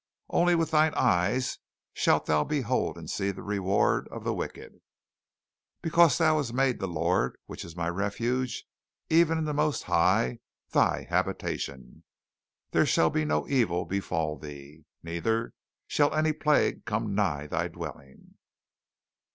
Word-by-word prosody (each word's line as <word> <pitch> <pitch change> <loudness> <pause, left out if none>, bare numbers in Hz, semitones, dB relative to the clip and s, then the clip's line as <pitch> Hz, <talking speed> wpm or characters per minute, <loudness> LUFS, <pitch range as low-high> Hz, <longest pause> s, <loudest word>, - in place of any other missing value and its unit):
"Only 175 0 +3
with 165 -1 0
thine 155 0 +3
eyes 90 +9 +1 0.3
shalt - - +2
thou 75 -1 +2
behold 130 - -1
and - - -9
see 100 - -1
the 100 - -6
reward 100 -1 +1
of - - -8
the - - -1
wicked. - - -7 1.0
"Because 170 -1 +5
thou 155 -2 +3
hast 135 -6 -2
made 135 -1 +2
the 95 - -2
Lord, 85 -3 0
which - - -8
is 85 -1 -10
my 85 -1 -2
refuge, 115 +8 -2 0.5
even 165 -1 +4
the 150 - -2
most 150 0 0
High, 60 0 +2 0.3
thy - - +2
habitation; 65 -2 -3 0.7
There - - +3
shall 80 - +3
no 75 -1 0
evil 110 -11 +1
befall 80 -5 -2
thee, 75 +1 -11 0.2
neither 110 +8 -1 0.3
shall 145 0 +1
any 155 0 +2
plague 150 -1 +1
come 105 -1 -2
nigh 85 -8 0
thy 75 - -1
dwelling. 65 -1 -10
105 Hz, 135 wpm, -28 LUFS, -, 1.0 s, Because